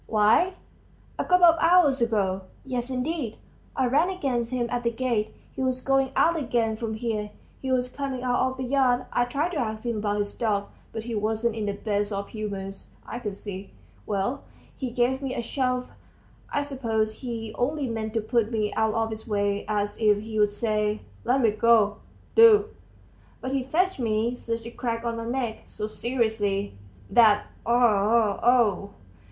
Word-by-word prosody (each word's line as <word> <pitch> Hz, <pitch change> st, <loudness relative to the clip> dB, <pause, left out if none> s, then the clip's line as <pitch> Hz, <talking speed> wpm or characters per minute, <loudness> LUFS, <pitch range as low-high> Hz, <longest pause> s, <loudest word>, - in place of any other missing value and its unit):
"Why, 225 Hz, -, +3 dB, 0.6 s
a -, -, +2 dB
couple 360 Hz, -1 st, +5 dB
of 330 Hz, -1 st, +6 dB
hours 330 Hz, -7 st, +5 dB
ago. 195 Hz, -5 st, 0 dB, 0.2 s
Yes, 250 Hz, -1 st, -2 dB
indeed! 255 Hz, -2 st, -2 dB, 0.4 s
I 260 Hz, -, +2 dB
ran 290 Hz, +8 st, +3 dB
against 265 Hz, -11 st, -1 dB
him 250 Hz, -1 st, -1 dB
at 245 Hz, 0 st, 0 dB
the 235 Hz, -, +1 dB
gate; 235 Hz, -3 st, -1 dB, 0.2 s
he -, -, -6 dB
was 255 Hz, -1 st, 0 dB
going 270 Hz, 0 st, +1 dB
out 335 Hz, 0 st, +3 dB
again 235 Hz, -5 st, 0 dB
from 220 Hz, 0 st, -4 dB
here; 215 Hz, -2 st, -2 dB, 0.3 s
he 265 Hz, -, -2 dB
was 250 Hz, -1 st, +2 dB
coming 265 Hz, -1 st, -4 dB
out 245 Hz, -1 st, +1 dB
of 260 Hz, -, -8 dB
the 260 Hz, -, -3 dB
yard. 250 Hz, -1 st, +2 dB
I 245 Hz, -, +3 dB
tried 285 Hz, +8 st, -1 dB
to 320 Hz, -, -2 dB
ask 220 Hz, -2 st, -3 dB
him 235 Hz, -2 st, -1 dB
about 205 Hz, 0 st, -1 dB
his 205 Hz, 0 st, -2 dB
dog, 205 Hz, -3 st, -1 dB, 0.2 s
but 220 Hz, -, -5 dB
he 235 Hz, 0 st, -5 dB
wasn't 220 Hz, +2 st, 0 dB
in 215 Hz, -2 st, -2 dB
the 200 Hz, -, 0 dB
best 205 Hz, 0 st, -1 dB
of 200 Hz, 0 st, -3 dB
humors, 195 Hz, -3 st, -6 dB, 0.2 s
I 235 Hz, -, -5 dB
could 210 Hz, -5 st, -4 dB
see. 195 Hz, -1 st, -8 dB, 0.3 s
Well, 200 Hz, +6 st, -1 dB, 0.3 s
he 260 Hz, -, -4 dB
gave 245 Hz, +3 st, +1 dB
me 270 Hz, -2 st, -3 dB
a 240 Hz, -, -1 dB
shove; 255 Hz, 0 st, -1 dB, 0.6 s
I 290 Hz, -, 0 dB
suppose 225 Hz, -6 st, -1 dB
he 225 Hz, -3 st, -6 dB
only 280 Hz, +3 st, -1 dB
meant 220 Hz, -1 st, -4 dB
to 225 Hz, -, +2 dB
put 225 Hz, 0 st, 0 dB
me 215 Hz, -2 st, -1 dB
out 220 Hz, -1 st, +1 dB
of 225 Hz, 0 st, 0 dB
his 220 Hz, +1 st, -7 dB
way, 205 Hz, -1 st, 0 dB
as 205 Hz, -1 st, -1 dB
if 210 Hz, -1 st, +4 dB
he'd 215 Hz, -2 st, +1 dB
say, 210 Hz, 0 st, 0 dB, 0.2 s
'Let 255 Hz, +3 st, +3 dB
me 225 Hz, -3 st, +4 dB
go, 215 Hz, -1 st, +4 dB, 0.4 s
do!' 440 Hz, -2 st, +7 dB, 0.7 s
but 260 Hz, -, -4 dB
he 270 Hz, -1 st, 0 dB
fetched 360 Hz, +5 st, +1 dB
me 225 Hz, 0 st, 0 dB
such 230 Hz, -2 st, -4 dB
a 235 Hz, -, -6 dB
crack 235 Hz, -1 st, -3 dB
on 230 Hz, -1 st, -1 dB
my 230 Hz, -, -4 dB
neck, 235 Hz, -2 st, -2 dB
so 210 Hz, -, -5 dB
seriously, 215 Hz, -3 st, -1 dB, 0.3 s
that 215 Hz, -3 st, +5 dB, 0.2 s
oh! 225 Hz, -2 st, +3 dB
oh!" 230 Hz, -5 st, +3 dB
230 Hz, 180 wpm, -26 LUFS, 215-255 Hz, 0.7 s, do